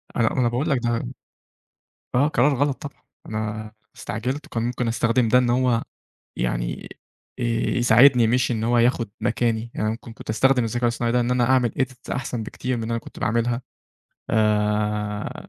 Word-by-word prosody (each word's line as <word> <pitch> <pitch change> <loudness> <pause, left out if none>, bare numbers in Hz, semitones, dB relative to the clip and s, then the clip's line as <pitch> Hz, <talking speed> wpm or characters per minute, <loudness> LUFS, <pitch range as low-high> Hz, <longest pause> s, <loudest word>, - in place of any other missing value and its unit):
أ - - -2
ما 115 -2 +3
أنا 125 -3 +1
باقول 130 +7 -1
لك 135 -4 +2
ده 120 - -1 1.1
آه، 140 +4 +4
قرار 145 -1 +3
غلط 140 +1 0
طبعًا، 140 - -12 0.2
أنا 110 0 -4 0.2
استعجلت 125 +7 -4
وكان 115 - -3
ممكن 120 0 -1
أستخدم 115 +1 +1
ده 125 +3 +5
إن 125 -1 +2
هو 125 -2 +2 0.5
يعني - - -2 0.5
يساعدني 120 +1 +4
مش 125 +3 +2
إن 110 -2 -1
هو 120 +1 +2
ياخد 120 -1 +2
مكاني، 115 0 0
يعني 110 0 -1
ممكن 115 +1 -7
كنت - - -8
أستخدم 125 +3 +3
الذكاء 120 +2 -3
الاصطناعي 120 0 0
ده 125 - +3
إن 120 0 0
أنا 125 -1 +2
أعمل 125 -3 +3
إيديت 130 -2 -3
أحسن 125 -3 -3
بكتير 125 +3 -3
من 115 - -4
اللي 110 - -4
أنا 115 - 0
كنت - - -12
باعملها، 115 +2 0 0.7
آآ، 105 -1 0
120 Hz, 170 wpm, -23 LUFS, 110-125 Hz, 1.1 s, ده